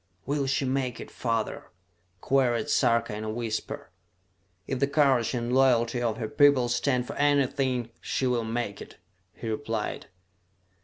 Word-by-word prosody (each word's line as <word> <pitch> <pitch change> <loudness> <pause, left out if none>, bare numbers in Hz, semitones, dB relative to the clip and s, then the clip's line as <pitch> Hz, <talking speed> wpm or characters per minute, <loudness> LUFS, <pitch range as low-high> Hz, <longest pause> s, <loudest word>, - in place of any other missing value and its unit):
"Will 140 -1 -1
she 135 +1 0
make 130 -1 -1
it, - - -9
father?" 115 -2 -2 0.5
queried 125 -4 +1
Sarka 115 -1 +2
in 105 - -5
a 110 - -3
whisper. 110 0 -4 0.7
"If 135 - -3
the 140 - +2
courage 135 -5 +2
and 120 0 -2
loyalty 120 -2 +3
of 115 -2 0
her 110 - -3
people 140 -2 +4
stand 125 +1 +1
for - - -6
anything, 135 -4 +1
she 130 - -1
will 125 -2 +1
make 115 -2 -3
it," - - -11 0.4
he 115 - -7
replied. 110 -1 -3
125 Hz, 150 wpm, -27 LUFS, 115-135 Hz, 0.7 s, people